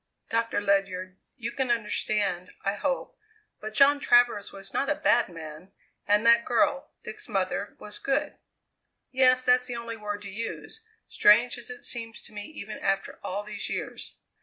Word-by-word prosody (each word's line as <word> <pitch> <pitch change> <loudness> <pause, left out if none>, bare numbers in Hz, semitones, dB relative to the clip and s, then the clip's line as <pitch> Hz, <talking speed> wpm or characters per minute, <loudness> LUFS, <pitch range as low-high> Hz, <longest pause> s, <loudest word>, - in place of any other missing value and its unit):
"Doctor 230 -2 +1
Ledyard, 190 -2 0 0.2
you 235 -2 -4
can 265 0 -2
understand, 210 -5 0
I 195 - +2
hope, 275 - -3 0.4
but 215 0 -7
John 285 +2 +6
Travers 240 -6 +3
was 195 0 -10
not 275 - 0
a 295 - +2
bad 240 -6 +3
man, 165 +2 -10 0.4
and 210 +2 +3
that 235 0 +7
girl, 255 +3 +1
Dick's 215 +2 -6
mother, 200 0 -2
was 210 - -8
good. 290 +2 -1 0.7
Yes; 255 -1 +4
that's 250 0 +4
the 245 - -4
only 235 -1 -5
word 205 -1 -5
to 200 - -7
use, 230 - -6 0.3
strange 235 +4 +5
as 240 - -8
it 250 0 -9
seems 230 -2 -4
to - - -12
me 205 0 -6
even 215 -9 -8
after 195 0 -1
all 200 +3 -3
these 210 -1 -5
years. - - -5
215 Hz, 165 wpm, -27 LUFS, 200-245 Hz, 0.7 s, that